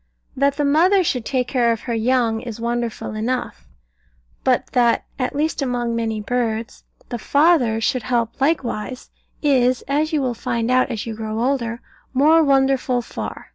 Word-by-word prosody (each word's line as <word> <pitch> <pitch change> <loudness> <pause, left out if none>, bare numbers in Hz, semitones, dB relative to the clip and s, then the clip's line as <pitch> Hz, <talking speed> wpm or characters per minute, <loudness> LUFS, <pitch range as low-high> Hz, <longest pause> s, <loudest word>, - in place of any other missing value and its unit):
That 280 +1 +2
the 295 - +1
mother 355 +7 +4
should 250 -8 -1
take 255 -1 0
care 240 -3 +2
of 225 - -2
her 235 - -4
young, 230 -1 +1
is 235 -2 -7
wonderful 235 -1 -3
enough; 240 +4 -3 0.8
but 255 -2 +2
that 240 -2 +2
(at 255 +1 -2
least 310 +1 -1
among 245 -3 -1
many 225 -2 -2
birds) 230 0 -3 0.2
the 240 - -4
father 280 -6 +3
should 250 +3 0
help 235 +2 -2
likewise, 260 -5 -1 0.3
is 255 -3 +3
(as 295 +3 0
you 310 - +1
will 250 -2 0
find 235 0 -2
out 255 +1 +3
as 225 -4 -4
you 230 - -4
grow 220 0 -4
older) 240 -2 -1 0.3
more 315 +5 +5
wonderful 270 -3 +2
far. - - -7
250 Hz, 165 wpm, -21 LUFS, 230-275 Hz, 0.8 s, more